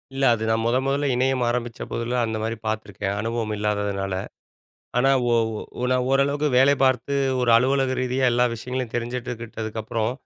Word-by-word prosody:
இல்ல. 135 Hz, -, +1 dB
அது 110 Hz, -, -5 dB
நான் 110 Hz, 0 st, +1 dB
முதன் 130 Hz, +3 st, +1 dB
முதல்ல 140 Hz, +1 st, +1 dB
இணையம் 130 Hz, 0 st, +1 dB
ஆரம்பிச்ச 120 Hz, -1 st, -2 dB
போதில 120 Hz, +1 st, -1 dB
அந்தமாரி 110 Hz, 0 st, -3 dB
பார்த்துருக்கேன். 105 Hz, -2 st, -3 dB
அனுபவம் 115 Hz, -1 st, -2 dB
இல்லாததுனால. 100 Hz, -2 st, -1 dB, 0.9 s
ஆனா, 135 Hz, +2 st, +4 dB, 0.2 s
ஒ -, -, +3 dB, 0.5 s
ஒ -, -, 0 dB
நான் 125 Hz, 0 st, +1 dB
ஓரளவுக்கு 140 Hz, +2 st, +2 dB
வேலை 140 Hz, +2 st, +5 dB
பார்த்து 130 Hz, +1 st, +2 dB, 0.3 s
ஒரு 125 Hz, -, +2 dB
அலுவலக 130 Hz, +1 st, +2 dB
ரீதியா 130 Hz, +1 st, 0 dB
எல்லா 120 Hz, +1 st, +3 dB
விஷயங்களையும் 125 Hz, +1 st, -4 dB
தெரிஞ்சிட்டுக்கிட்டதுக்கப்புறம், 115 Hz, -2 st, -3 dB
120 Hz, 145 wpm, -24 LUFS, 110-130 Hz, 0.9 s, வேலை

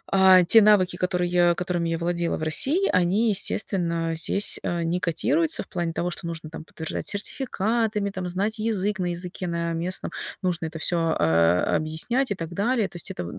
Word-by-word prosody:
а, 190 Hz, -1 st, +6 dB
те 225 Hz, +6 st, +6 dB
навыки, 200 Hz, -4 st, +3 dB
которые 175 Hz, -1 st, +1 dB
которыми 175 Hz, -1 st, -3 dB
я 165 Hz, -, -2 dB
владела 170 Hz, 0 st, -2 dB
в 155 Hz, -, -6 dB
России, 285 Hz, -, +4 dB
они, 190 Hz, +6 st, +1 dB
естественно, 170 Hz, -5 st, 0 dB
здесь, 200 Hz, +5 st, +5 dB
а, 175 Hz, -1 st, -2 dB
не 170 Hz, +2 st, -1 dB
котируются 285 Hz, -, 0 dB
в -, -, -23 dB
плане 170 Hz, -2 st, -3 dB
того, 175 Hz, +2 st, -3 dB
что 170 Hz, -, -7 dB
нужно 165 Hz, -2 st, -7 dB
там 160 Hz, 0 st, -10 dB
подтверждать 160 Hz, -1 st, -5 dB
сертификатами, 215 Hz, -1 st, -1 dB
там, 185 Hz, -2 st, -5 dB
знать 205 Hz, +5 st, -3 dB
язык, 210 Hz, -2 st, -1 dB
на 180 Hz, -, -1 dB
языке 175 Hz, +1 st, -5 dB
на 170 Hz, -1 st, -3 dB
местном 175 Hz, +3 st, -3 dB, 0.3 s
нужно 175 Hz, -2 st, -2 dB
это 160 Hz, -, -8 dB
всё, 165 Hz, -1 st, 0 dB
э, 85 Hz, +2 st, +3 dB, 0.2 s
объяснять 185 Hz, -, -1 dB
и -, -, 0 dB
так 165 Hz, -2 st, -7 dB
далее. 220 Hz, +2 st, 0 dB
То 175 Hz, -, -11 dB
есть 170 Hz, -, -4 dB
это, 90 Hz, -, -6 dB
э, -, -, -7 dB
180 Hz, 190 wpm, -24 LUFS, 170-205 Hz, 0.3 s, а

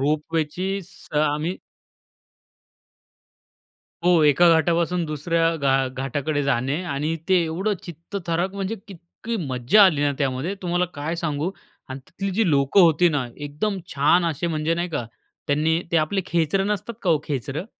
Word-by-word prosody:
रोपवेचीच 160 Hz, +6 st, -1 dB
स -, -, -14 dB
आम्ही 155 Hz, +4 st, 0 dB, 2.5 s
हो, 175 Hz, -3 st, +5 dB
एका 150 Hz, +4 st, +5 dB
घाटापासून 170 Hz, +2 st, +1 dB
दुसऱ्या 165 Hz, +2 st, 0 dB
घा 135 Hz, -2 st, +2 dB
घाटाकडे 140 Hz, +3 st, -2 dB
जाणे 140 Hz, +4 st, 0 dB
आणि 150 Hz, +1 st, -2 dB
ते 190 Hz, -, +4 dB
एवढं 190 Hz, +6 st, -1 dB
चित्तथरारक 175 Hz, +2 st, -4 dB
म्हणजे 200 Hz, +2 st, -3 dB
इतकी 195 Hz, +5 st, -7 dB
मज्जा 130 Hz, -, +5 dB
आली 160 Hz, -7 st, +3 dB
ना, 145 Hz, -1 st, +2 dB
त्यामध्ये 140 Hz, +6 st, -1 dB
तुम्हाला 175 Hz, 0 st, +1 dB
काय 150 Hz, +4 st, -3 dB
सांगू 155 Hz, 0 st, -2 dB, 0.4 s
आणि 130 Hz, +1 st, -6 dB
तिथली 195 Hz, +3 st, -4 dB
जी 215 Hz, -4 st, +2 dB
लोकं 140 Hz, +6 st, +4 dB
होती 170 Hz, 0 st, +5 dB
ना, 145 Hz, -5 st, -1 dB
एकदम 150 Hz, +8 st, -3 dB, 0.2 s
छान 160 Hz, +5 st, +4 dB
असे 165 Hz, +1 st, -1 dB
म्हणजे 160 Hz, 0 st, 0 dB
नाही 175 Hz, +1 st, -2 dB
का, 145 Hz, -7 st, -3 dB, 0.4 s
त्यांनी 155 Hz, +3 st, +1 dB
ते -, -, +4 dB
आपले 165 Hz, +5 st, +1 dB
खेचरं 170 Hz, +3 st, +1 dB
नसतात 210 Hz, +2 st, -3 dB
का 180 Hz, -, +1 dB
हो 160 Hz, -, +4 dB
खेचरं. 145 Hz, -, -4 dB
165 Hz, 145 wpm, -23 LUFS, 145-180 Hz, 2.5 s, हो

